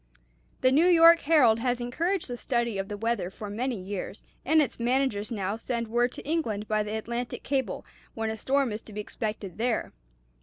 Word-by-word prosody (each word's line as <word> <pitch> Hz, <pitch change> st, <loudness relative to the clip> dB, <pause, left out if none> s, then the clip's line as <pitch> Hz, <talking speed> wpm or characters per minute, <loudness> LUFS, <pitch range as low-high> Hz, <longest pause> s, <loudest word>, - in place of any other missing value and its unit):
"The 255 Hz, -, +4 dB
New 310 Hz, +6 st, +5 dB
York 335 Hz, -1 st, +8 dB
Herald 270 Hz, -9 st, +4 dB
has 245 Hz, 0 st, 0 dB
encouraged 330 Hz, +10 st, -1 dB
the 245 Hz, -, -4 dB
study 235 Hz, -4 st, -1 dB
of 195 Hz, -, -3 dB
the 205 Hz, -, -5 dB
weather 225 Hz, -4 st, -1 dB
for 205 Hz, +1 st, -8 dB
many 240 Hz, +1 st, -2 dB
years, 195 Hz, +1 st, -6 dB, 0.2 s
and 315 Hz, +3 st, +4 dB
its 280 Hz, -6 st, 0 dB
managers 240 Hz, -3 st, 0 dB
now 200 Hz, -2 st, -2 dB
send 235 Hz, -1 st, -3 dB
word 240 Hz, +2 st, +2 dB
to -, -, -10 dB
England 225 Hz, -11 st, -1 dB
by 215 Hz, 0 st, +1 dB
the 210 Hz, +1 st, -3 dB
Atlantic 235 Hz, +2 st, -4 dB
cable 265 Hz, -8 st, -2 dB, 0.3 s
when 225 Hz, -1 st, -2 dB
a 220 Hz, -, -5 dB
storm 270 Hz, -1 st, +1 dB
is 210 Hz, +1 st, -4 dB
to 215 Hz, -, -13 dB
be 210 Hz, -, -5 dB
expected 210 Hz, -2 st, -5 dB
there. 235 Hz, -1 st, -1 dB
235 Hz, 195 wpm, -27 LUFS, 215-265 Hz, 0.3 s, York